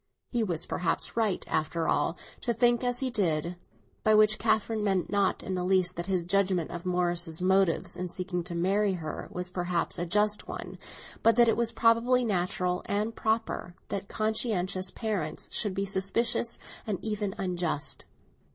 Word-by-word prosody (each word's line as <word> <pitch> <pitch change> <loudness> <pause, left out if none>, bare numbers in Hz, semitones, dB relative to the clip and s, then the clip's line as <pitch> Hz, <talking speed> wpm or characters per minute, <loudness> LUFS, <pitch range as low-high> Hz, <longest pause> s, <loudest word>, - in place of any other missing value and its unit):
He 240 -2 +1
was 175 -5 -1
perhaps 180 - 0
right, 220 -5 0
after 160 +1 -1
all, 155 +3 +1 0.2
to 235 -2 -1
think 240 +1 +3
as 245 0 0
he 260 -1 0
did; 170 -5 0 0.5
by 215 0 +5
which 215 0 +5
Catherine 220 0 +1
meant 190 -3 0
not 200 -2 +1
in 190 - -3
the 180 -1 -1
least 185 -1 +2
that 170 +1 -5
his 185 -3 0
judgement 185 -2 +1
of 175 +1 -6
Morris's 175 -2 +1
motives 190 -2 +2
in 180 0 -4
seeking 180 0 -3
to 175 -1 -5
marry 195 +3 +2
her 155 -4 -5
was 180 0 -4
perhaps 175 -2 -1
a 175 - -2
just 210 +3 +2
one, - - -7 0.4
but 230 -1 +5
that 240 0 +6
it 225 - +3
was 235 0 +1
probably 240 +2 +3
natural 180 -2 0
and 210 +3 -1
proper 220 -5 -1
that 195 0 -3
conscientious 195 -4 0
parents 200 -10 -3
should 205 -4 -1
be 195 0 -1
suspicious 210 +5 +1 0.3
and 205 -3 -1
even 210 -2 -2
unjust. 175 -7 -2
190 Hz, 170 wpm, -29 LUFS, 175-215 Hz, 0.5 s, that